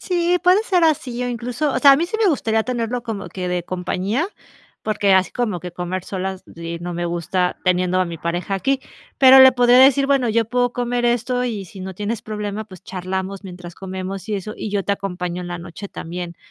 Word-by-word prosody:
Sí 355 -1 +1
puede 370 +4 +5
ser 365 -6 +2
así 255 -6 0
o 245 - -1
incluso, 245 +4 -2
o - - 0
sea, 280 +1 +8
a - - +5
mí 335 +3 0
sí 440 - -3
me 415 - +4
gustaría 225 -7 +1
tenerlo 240 -1 -2
como 225 -4 -5
que 180 -1 -5
de 180 -1 -1
compañía, 185 - -2 0.6
porque 205 -2 +2
así 185 -1 +3
como 215 -8 -2
que 180 0 -7
comer 180 +1 -4
solas 190 -1 -4
y 170 0 -5
no 175 0 -5
me 175 0 -2
gusta 175 +1 -1
teniendo 185 0 +2
a 185 - +2
mi 170 -1 -6
pareja 175 +4 -2
aquí, 270 +8 +1 0.4
pero 265 0 +9
le 260 0 +10
podría 245 0 +5
decir: 275 +1 +6
"Bueno, 270 -4 +2
yo 225 0 +2
puedo 245 +1 +1
comer 245 0 -1
esto 245 +1 +1
y 210 -5 -3
si 190 +2 -12
no 190 -1 -6
tienes 210 +2 -3
problema, 210 0 -4
pues, 185 -5 -14
charlamos 190 +1 -4
mientras 180 -2 -9
comemos 190 +1 -6
y 210 - 0
eso, 210 +2 -5
y - - -5
yo 200 -1 -1
te 200 - -1
acompaño 180 -3 -3
en 175 - -6
la 175 -1 -4
noche 175 +4 -8
también 175 0 -6
205 Hz, 220 wpm, -21 LUFS, 180-245 Hz, 0.6 s, le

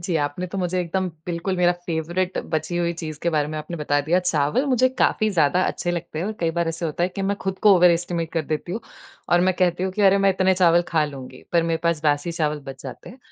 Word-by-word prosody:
जी, 170 0 -3
आपने 145 +4 -2
तो 195 +2 -5
मुझे 180 0 0
एकदम 185 +2 -1 0.2
बिल्कुल 175 +2 -2
मेरा 175 0 +4
फेवरिट 175 +3 -2 0.2
बची 155 +2 -2
हुई 170 0 0
चीज 155 -2 -5
के 170 - +1
बारे 150 -2 0
में 155 - -5
आपने 155 +3 -6
बता 145 -2 +1
दिया। 160 +5 +2
चावल 160 - +1
मुझे 255 -1 +3
काफ़ी 215 -1 +2
ज़्यादा 175 -1 +2
अच्छे 175 - -2
लगते 170 -2 -4
हैं 175 - -2
और 215 - -2
कई 165 -1 +1
बार 170 -1 +1
ऐसा 165 +1 -3
होता 160 +2 -3
है 175 - +2
कि 195 - -2
मैं 200 - -1
खुद 190 0 -2
को 205 - +9
ओवर 180 0 +6
एस्टिमेट 170 -1 -2
कर 165 -2 0
देती 155 +3 -3
हूँ। 220 - -3 0.5
और 175 - +4
मैं 185 - +2
कहती 180 -1 +1
हूँ 185 0 -1
कि 210 - -1
अरे 200 - +3
मैं 195 - +6
इतने 190 0 +2
चावल 175 -2 +4
खा 160 -2 +2
लूँगी। 135 -3 -9
पर 170 -1 +4
मेरे 165 - +2
पास 170 -2 +1
बासी 145 +2 +1
चावल 150 -2 -1
बच 135 -1 -9
जाते 125 -3 -9
हैं। 255 - -14
170 Hz, 260 wpm, -23 LUFS, 155-185 Hz, 0.5 s, को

